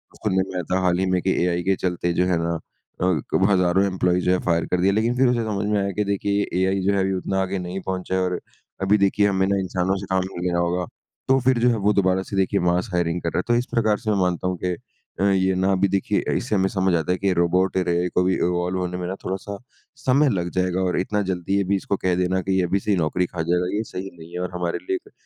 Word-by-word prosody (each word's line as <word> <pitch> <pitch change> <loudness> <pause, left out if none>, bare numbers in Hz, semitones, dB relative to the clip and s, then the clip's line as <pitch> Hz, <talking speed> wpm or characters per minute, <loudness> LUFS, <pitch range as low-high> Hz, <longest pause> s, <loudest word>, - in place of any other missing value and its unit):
सुनने 95 -3 0
में - - -7
आया 90 - -1
था, 95 - +2
हाल 90 -1 +2
ही 95 - +1
में 90 -1 +1
की 95 - +1
एआई 90 -1 0
के 95 0 +2
चलते 90 -1 -1
जो 90 - +2
है 90 -2 +2
ना, 85 0 -1 0.5
अ, 95 +3 +1
हज़ारों 90 +1 +3
एम्प्लॉई 90 -1 +1
जो 90 - +4
है 90 - +2
फायर 85 0 +2
कर 90 -1 +1
दिए। 95 - +4
लेकिन 115 +4 +1
फिर 130 - +4
उसे 120 -2 +1
समझ 105 -1 -2
में 105 -1 +2
आया 100 - -1
कि - - +3
देखिए 100 +1 0
एआई 95 +1 +1
जो 100 - +3
है 100 - +1
अभी 95 0 +1
उतना 95 +1 -1
आगे 95 0 -2
नहीं 95 +2 -4
पहुँचा 95 0 -2
है 95 - +1
और 90 -1 -1 0.4
अभी 100 +2 +3
देखिए 100 +1 +2
हमें 95 -1 +1
ना 100 0 +1
इंसानों 95 0 -1
से - - -6
काम 95 -1 +1
नहीं 90 -1 -4
लेना 85 -1 0
होगा 90 +1 0 0.4
तो 135 0 +4
फिर 130 -2 +4
जो 125 - +4
है 115 - +1
वो 105 - +4
दोबारा 95 -1 +2
से - - -2
देखिए 95 +1 +2
मास 90 +6 -1
हायरिंग 85 0 0
कर 85 - -1
रहा 85 - +1
है - - -1
तो 120 - +3
इस 125 - -3
प्रकार 110 -3 +2
से 110 -3 -1
मैं 100 - +1
मानता 90 -1 0
हूँ 90 -1 -1
के 90 - 0 0.5
अ, 95 - +1
ये 95 0 +2
ना 95 +1 +1
अभी 95 +1 +2
देखिए 95 0 0
इससे 110 - -2
हमें 95 -1 +2
समझ 95 -2 +1
आता 80 +2 0
है 90 - +1
कि 100 - -2
ये 95 - +3
रोबोट 90 +2 +1
और 90 -1 0
एआई 85 +1 +1
को 90 - +4
भी 95 0 +2
इवॉल्व 90 +1 0
होने 90 0 -3
में 90 -1 -4
ना 95 - -3
थोड़ा-सा 95 +2 -4 0.4
समय 140 +2 +3
लग 90 -4 -1
जाएगा 90 0 +1
और 90 -1 0
इतना 105 +2 0
जल्दी 95 +2 -1
ये 100 - +2
भी - - +4
इसको 100 +1 -1
कह 90 -1 +2
देना 90 +1 0
की 95 +1 0
ये 90 - +2
अभी 95 +3 0
से 105 - -2
ही 100 - +3
नौकरी 85 +2 0
खा 90 -1 -5
जाएगा 90 +3 0
ये 110 - -1
सही 95 -3 -6
नहीं 80 +1 -12
है 90 - -4
और 90 0 -3
हमारे 90 -1 -2
लिए 380 +2 -3
95 Hz, 285 wpm, -23 LUFS, 90-100 Hz, 0.5 s, जो